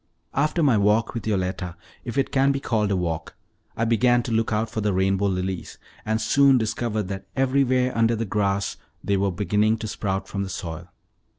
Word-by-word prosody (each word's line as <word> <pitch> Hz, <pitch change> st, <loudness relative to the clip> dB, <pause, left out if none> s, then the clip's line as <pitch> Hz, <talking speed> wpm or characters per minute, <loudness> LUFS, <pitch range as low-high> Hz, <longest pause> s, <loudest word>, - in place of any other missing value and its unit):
After 155 Hz, +4 st, +1 dB
my 125 Hz, -7 st, +4 dB
walk 105 Hz, +3 st, +2 dB
with 115 Hz, -3 st, -5 dB
Yoletta 90 Hz, -3 st, -2 dB, 0.3 s
if 120 Hz, +2 st, -5 dB
it 135 Hz, -, +1 dB
can 135 Hz, 0 st, +3 dB
be 140 Hz, -, -1 dB
called 110 Hz, -6 st, 0 dB
a 100 Hz, -, +1 dB
walk 80 Hz, -3 st, -3 dB, 0.4 s
I 115 Hz, -, +1 dB
began 120 Hz, +1 st, +3 dB
to 120 Hz, -, -5 dB
look 115 Hz, 0 st, +1 dB
out 110 Hz, +1 st, +1 dB
for 110 Hz, 0 st, -4 dB
the 105 Hz, -1 st, +1 dB
rainbow 95 Hz, +1 st, +1 dB
lilies, 95 Hz, -1 st, -3 dB, 0.3 s
and 110 Hz, 0 st, +1 dB
soon 140 Hz, +2 st, +4 dB
discovered 110 Hz, -2 st, -1 dB
that 95 Hz, -1 st, -6 dB
everywhere 130 Hz, -1 st, +2 dB
under 115 Hz, 0 st, +3 dB
the 115 Hz, +1 st, -2 dB
grass 100 Hz, -1 st, -1 dB, 0.3 s
they 100 Hz, -, +1 dB
were 100 Hz, 0 st, +1 dB
beginning 105 Hz, +4 st, +1 dB
to 110 Hz, -, -5 dB
sprout 95 Hz, -2 st, -3 dB
from 100 Hz, -, -4 dB
the 100 Hz, -, -3 dB
soil. 85 Hz, -2 st, -6 dB
110 Hz, 195 wpm, -24 LUFS, 95-120 Hz, 0.4 s, my